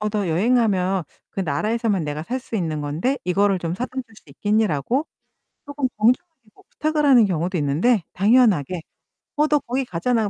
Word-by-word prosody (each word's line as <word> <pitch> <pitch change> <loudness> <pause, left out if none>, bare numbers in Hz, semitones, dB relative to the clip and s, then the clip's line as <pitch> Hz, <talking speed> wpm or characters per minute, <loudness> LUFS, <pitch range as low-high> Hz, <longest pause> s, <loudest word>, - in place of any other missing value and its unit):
"어, 210 - -1
너 205 -3 -1
여행 195 +10 +2
가면 190 -6 +1 0.3
그 - - -4
나라에서만 205 +4 0
내가 150 +1 -4
살 250 +10 -3
수 235 - -5
있는 160 -6 -2
건데 170 - -1
이거를 195 +2 +2
좀 170 -1 -3
사다 245 +7 -4
줄 235 -4 -6
수 - - -16
있겠니?"라고 215 - 0 0.6
쪼끔 285 -2 -2
정중하게 265 +9 +1
뭐 - - -22
부탁을 305 -1 -1
하는 250 -5 +6
경우도 180 0 -1
있는데 165 - +2
당연하게 195 - +3 0.5
"어, 300 +1 +3
너 300 -1 +3
거기 260 +1 -2
가잖아. 220 +3 0
210 Hz, 360 characters per minute, -22 LUFS, 175-250 Hz, 0.6 s, 하는